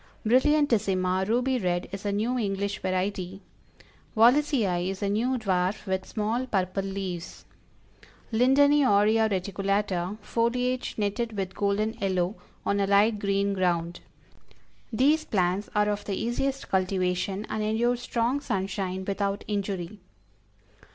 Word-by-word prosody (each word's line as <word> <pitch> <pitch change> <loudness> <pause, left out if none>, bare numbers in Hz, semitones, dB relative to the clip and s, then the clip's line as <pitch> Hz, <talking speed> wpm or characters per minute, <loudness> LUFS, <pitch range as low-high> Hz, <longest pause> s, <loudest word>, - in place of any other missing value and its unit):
Brilliantissima, 220 -8 +2
ruby 250 +2 +1
red, 175 -3 -1
is 200 +1 -5
a - - +1
new 220 +5 0
English 200 -1 -2
variety; 185 0 -2 0.8
Wallisii 230 -7 +3
is 195 +1 -5
a 200 - +1
new 240 +6 +1
dwarf, 190 -2 -1
with 190 -1 -2
small 225 +4 -2
purple 190 -3 -1
leaves; 190 -3 -5 0.9
Lindeni 280 +5 +5
Aurea 220 0 +4
Reticulata, 195 0 -1
foliage 250 +2 -1
netted 215 +1 -2
with 190 -1 -3
golden 205 +2 0
yellow, 185 -1 0 0.3
on 200 - +1
a 200 - +1
light 205 +2 +4
green 200 0 0
ground. 175 -2 0 0.9
These 290 +7 +3
plants 185 0 0
are 210 0 +3
of 205 0 -2
the 200 - -2
easiest 265 +6 -2
cultivation, 190 +1 0
and 215 - -3
endure 225 +3 +1
strong 245 +2 -1
sunshine 190 -4 -3
without 200 0 -2
injury. 200 -2 -3
200 Hz, 125 wpm, -27 LUFS, 190-230 Hz, 0.9 s, Lindeni